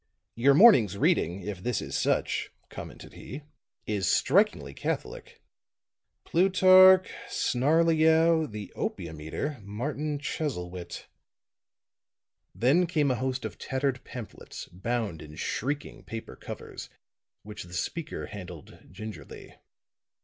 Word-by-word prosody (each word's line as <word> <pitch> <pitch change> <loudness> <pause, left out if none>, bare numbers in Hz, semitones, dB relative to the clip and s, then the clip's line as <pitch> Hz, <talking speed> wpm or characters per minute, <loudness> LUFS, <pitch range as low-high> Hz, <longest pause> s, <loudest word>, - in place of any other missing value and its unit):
"Your 135 +4 +4
morning's 130 - +7
reading, 90 0 +1
if 100 -2 -5
this 120 0 -1
is - - -5
such," - - 0 0.2
commented - - -10
he, 140 +4 -9 0.4
"is 100 -4 -1
strikingly 70 -1 +2
catholic. - - -5 0.8
Plutarch, 185 +1 +6 0.2
Snarleyow, 160 +3 +3
the 105 -1 -7
Opium 80 -2 -4
Eater, 130 - -4
Martin 145 +9 -3
Chuzzlewit." 90 - -5 1.5
Then 150 +9 +3
came 150 -5 +1
a - - +1
host 130 0 -2
of - - -7
tattered 130 -1 -2
pamphlets, 120 -4 -9
bound 100 -2 -3
in 75 0 -11
shrieking 140 - -3
paper 115 0 -7
covers, - - -8 0.5
which 105 +1 -8
the 90 - -13
speaker 160 - -4
handled 90 -6 -10
gingerly. 100 -1 -9
125 Hz, 105 wpm, -28 LUFS, 100-155 Hz, 1.5 s, morning's